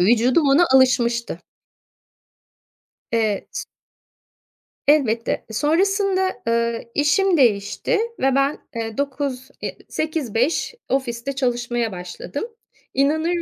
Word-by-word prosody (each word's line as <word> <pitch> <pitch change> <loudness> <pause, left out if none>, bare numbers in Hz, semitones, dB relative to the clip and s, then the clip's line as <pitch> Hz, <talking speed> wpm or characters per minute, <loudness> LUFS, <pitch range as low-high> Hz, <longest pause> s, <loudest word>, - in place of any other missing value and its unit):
Vücudum 245 - +4
ona 285 +6 +6
alışmıştı. 240 -3 +3 1.7
Eee. 220 -3 0
Si - - -5 1.2
Elbette. 245 -6 +2
Sonrasında, 380 - +2 0.2
ııı, 235 0 +1
işim 335 +5 +3
değişti 235 - +2 0.2
ve 265 0 +2
ben, 275 +2 +2 0.2
eee, 225 -1 -4
09.00, 275 -2 -3
eee, - - -5
08.00-17.00 310 - -1
ofiste 260 0 -2
çalışmaya 240 -3 -1
başladım. 180 +9 -6 0.5
İnanır 315 +5 +1
265 Hz, 90 wpm, -22 LUFS, 235-300 Hz, 1.7 s, ona